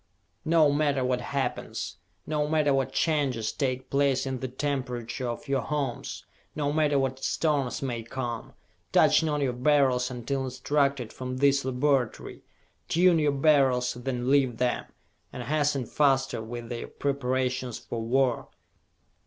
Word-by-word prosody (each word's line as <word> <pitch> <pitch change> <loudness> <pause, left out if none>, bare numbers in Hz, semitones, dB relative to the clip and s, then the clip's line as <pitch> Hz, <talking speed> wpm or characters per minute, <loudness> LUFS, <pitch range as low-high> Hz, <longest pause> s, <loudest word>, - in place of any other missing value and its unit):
"No 160 -2 +4
matter 145 -3 +1
what 125 -1 0
happens, 135 -9 -3 0.3
no 150 -1 0
matter 150 -2 +2
what 135 -1 0
changes 135 -8 0
take 130 -2 -3
place 140 -1 +2
in 130 -1 -3
the 130 - -3
temperature 125 -2 -3
of 120 +5 -6
your 135 -1 +1
homes, 140 -3 -3 0.3
no 145 -1 -1
matter 150 -2 +2
what 135 0 -1
storms 145 -5 0
may 120 -3 -2
come, 120 0 -5 0.4
touch - - +5
not 150 -2 0
your 130 -3 +1
Beryls 130 -1 +2
until 130 +2 -3
instructed 135 -1 0
from 130 0 -5
this 140 0 +3
laboratory! 130 -1 0 0.5
Tune 175 0 +4
your 150 -1 +2
Beryls, 135 -4 +3
then 125 0 -2
leave 135 -5 +3
them, 125 -1 0 0.5
and 125 - -6
hasten 145 -1 0
faster 135 -2 +1
with 120 +1 -7
your 120 - -4
preparations 130 -3 -1
for 115 - -5
war! 125 +1 +1
135 Hz, 140 wpm, -27 LUFS, 125-145 Hz, 0.5 s, touch